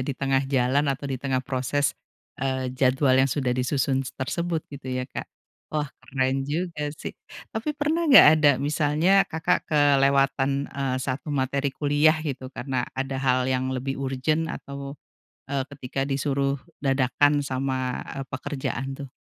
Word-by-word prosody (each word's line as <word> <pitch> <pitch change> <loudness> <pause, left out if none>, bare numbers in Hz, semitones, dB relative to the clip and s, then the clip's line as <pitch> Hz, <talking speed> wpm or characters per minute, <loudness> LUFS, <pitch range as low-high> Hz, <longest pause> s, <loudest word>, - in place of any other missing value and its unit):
di 140 - -2
tengah 135 -1 +1
jalan 135 +2 +2
atau 140 +1 -2
di 135 - -2
tengah 130 -2 0
proses, 135 +1 0 0.5
eee, 130 -1 -1
jadwal 130 +1 +2
yang 135 - +3
sudah 130 -2 0
disusun 130 +1 +1
s - - -7
tersebut 165 +4 -2
gitu 135 -2 -8
ya 125 - -2
Kak, - - -6 0.5
wah 150 -2 -1
keren 130 0 -1
juga 155 -1 -2
sih. - - -6 0.4
Tapi 225 +8 -2
pernah 310 +3 0
nggak 270 - +10
ada 150 -2 +5
misalnya 150 +4 +1 0.2
Kakak 160 +3 0
kelewatan, 140 -1 +3
eee, 135 -2 -1
1 130 +3 -3
materi 140 +1 0
kuliah 150 +2 +3
gitu 130 -3 -4
karena 130 -1 -2
ada 135 0 -2
hal 130 -1 +2
yang 130 0 0
lebih 130 +1 -3
urgent 135 +5 0
atau, 140 -2 -7 0.5
eee, 135 -1 -1
ketika 135 -1 -4
disuruh 140 0 0 0.2
dadakan 140 +2 +3
sama, 130 -1 -2 0.2
eee, - - -4
pekerjaan 135 -1 -4
tuh? 140 -1 -7
135 Hz, 150 wpm, -25 LUFS, 130-145 Hz, 0.5 s, nggak